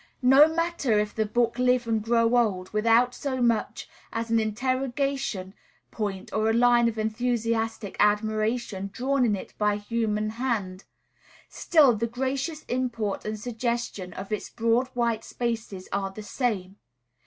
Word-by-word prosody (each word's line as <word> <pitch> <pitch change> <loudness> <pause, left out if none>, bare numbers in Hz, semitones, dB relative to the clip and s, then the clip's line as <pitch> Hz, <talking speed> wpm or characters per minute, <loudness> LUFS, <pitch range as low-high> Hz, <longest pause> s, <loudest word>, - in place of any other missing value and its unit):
No 275 +5 +7
matter 335 -9 0
if 210 0 0
the 220 -1 -1
book 235 +2 0
live 250 -1 +3
and 225 -1 0
grow 230 +1 +2
old, 195 -6 +1
without 230 +3 +3
so 265 -1 -3
much 235 -2 0 0.2
as 230 0 -3
an 230 - +4
interrogation 255 -2 -2 0.4
point 200 -3 -4
or 215 +1 +1
a - - +2
line 240 0 +4
of 225 - -7
enthusiastic 225 -1 -1
admiration 215 -1 0
drawn 265 +4 0
in 220 -4 +2
it 190 - -9
by 210 -1 +2
human 215 0 -1
hand, 200 -7 -2 0.6
still 290 -8 +4
the 230 +2 -1
gracious 270 +6 -3
import 235 -5 -2
and 215 0 -3
suggestion 235 -4 -3
of 195 +2 -8
its 210 - -3
broad 230 +2 +1
white 235 -2 0
spaces 225 -6 -4
are 195 -1 -1
the 210 +2 -9
same. 205 -5 -2
230 Hz, 145 wpm, -26 LUFS, 210-245 Hz, 0.6 s, No